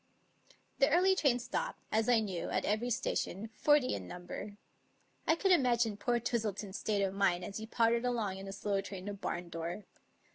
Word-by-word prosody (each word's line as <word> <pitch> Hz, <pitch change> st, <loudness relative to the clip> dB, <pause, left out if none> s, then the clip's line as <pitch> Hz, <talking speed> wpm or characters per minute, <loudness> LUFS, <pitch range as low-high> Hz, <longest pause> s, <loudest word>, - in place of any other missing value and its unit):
The -, -, +5 dB
early 380 Hz, +2 st, +4 dB
train 280 Hz, -9 st, +3 dB
stopped, 250 Hz, +1 st, -3 dB
as 220 Hz, +2 st, +2 dB
I 235 Hz, -2 st, +5 dB
knew, 190 Hz, -5 st, -3 dB
at -, -, 0 dB
every 215 Hz, +4 st, 0 dB
station, 225 Hz, -3 st, -2 dB
forty 295 Hz, +2 st, +3 dB
in 95 Hz, -2 st, -4 dB
number. 180 Hz, -, -7 dB, 0.7 s
I 320 Hz, -, +5 dB
could 385 Hz, +3 st, +2 dB
imagine 240 Hz, -, +3 dB
poor 240 Hz, +3 st, 0 dB
Twistleton's 215 Hz, -4 st, -2 dB
state 205 Hz, -2 st, 0 dB
of 190 Hz, -1 st, 0 dB
mind 180 Hz, -3 st, +1 dB
as 200 Hz, -, -6 dB
he 220 Hz, 0 st, -6 dB
pottered 230 Hz, +1 st, +2 dB
along 220 Hz, -6 st, -1 dB
in 195 Hz, -, -8 dB
a -, -, -5 dB
slow 200 Hz, 0 st, -1 dB
train 195 Hz, -1 st, -7 dB
to 205 Hz, -, -3 dB
Barndore. 175 Hz, -1 st, -4 dB
215 Hz, 180 wpm, -33 LUFS, 195-245 Hz, 0.7 s, The